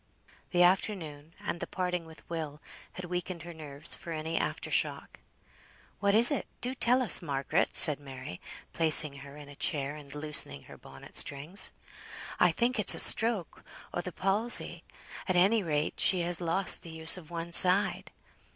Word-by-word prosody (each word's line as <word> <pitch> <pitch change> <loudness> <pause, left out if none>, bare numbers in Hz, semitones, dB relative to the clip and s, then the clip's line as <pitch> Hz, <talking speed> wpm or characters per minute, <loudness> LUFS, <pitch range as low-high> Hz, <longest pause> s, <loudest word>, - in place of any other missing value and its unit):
The 175 -1 +2
afternoon, 165 -5 -2
and 170 - -6
the - - -6
parting 180 -2 -4
with 160 -2 -17
Will, 155 -3 -7 0.3
had 185 - -9
weakened 180 -1 -6
her 170 0 -10
nerves 150 -1 -6
for 170 - -8
any 160 +1 -5
after - - -4
shock. - - -2 0.8
"What 200 0 +1
is 235 +4 +7
it? 285 - -3
Do 250 +1 -1
tell 255 -1 +2
us, 240 - +5
Margaret!" 145 +1 -2
said 150 -4 +6
Mary, 130 -9 -11 0.3
placing 155 -3 +3
her 140 +1 -13
in 145 -1 -13
a 145 - -14
chair, 145 -1 -2
and 145 -2 -11
loosening 145 - 0
her - - -15
bonnet 70 0 -16
strings. 150 +8 0 0.7
"I - - +4
think 245 0 -1
it's 210 - +4
a - - -8
stroke 220 -6 +2 0.3
o' 175 - -3
the 180 - -7
palsy. 200 +7 -2 0.4
Any 190 +4 +2
rate 155 -4 -3
she 185 -2 +2
has 175 0 +1
lost 175 +3 +2
the 170 - -12
use 160 0 0
of 170 -4 -12
one 170 0 -7
side." 185 +3 +6
170 Hz, 170 wpm, -28 LUFS, 150-185 Hz, 0.8 s, is